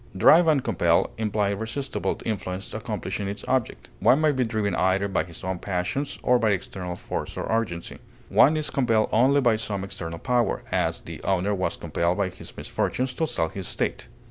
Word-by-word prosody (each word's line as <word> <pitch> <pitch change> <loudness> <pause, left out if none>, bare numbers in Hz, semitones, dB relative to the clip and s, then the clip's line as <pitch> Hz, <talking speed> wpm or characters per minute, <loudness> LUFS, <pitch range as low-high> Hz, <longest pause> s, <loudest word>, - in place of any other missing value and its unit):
Drive 165 - +7
and 150 -5 +3
compel - - +2
imply 105 -2 +1
irresistible 110 +7 -3
influence 95 -3 -4
accomplishing 105 -2 -3
its 100 +1 -5
object. 120 - -1
One 135 - +5
may 155 -1 +4
be 130 -2 +1
driven 110 -3 -1
either 95 +2 +2
by 95 - 0
his 85 -2 -11
own 95 -1 -2
passions 100 +10 -2
or 125 -1 +4
by 110 - +2
external 95 -2 -3
force - - -5
or - - -2
urgency; 105 -7 -2 0.3
one 155 +3 +5
is 155 - -2
compelled 115 -5 +2
only 135 +5 +4
by 120 -4 +3
some 100 -3 -3
external 85 -4 -6
power; 125 +4 0
as, - - 0
the - - -9
owner 95 +1 +1
was 95 -2 -1
compelled 85 +1 0
by 100 -2 +1
his - - -11
misfortunes 130 0 -1
to 160 +5 -1
sell 80 - -1
his 95 +1 -5
estate. - - -2
105 Hz, 185 wpm, -25 LUFS, 95-125 Hz, 0.3 s, Drive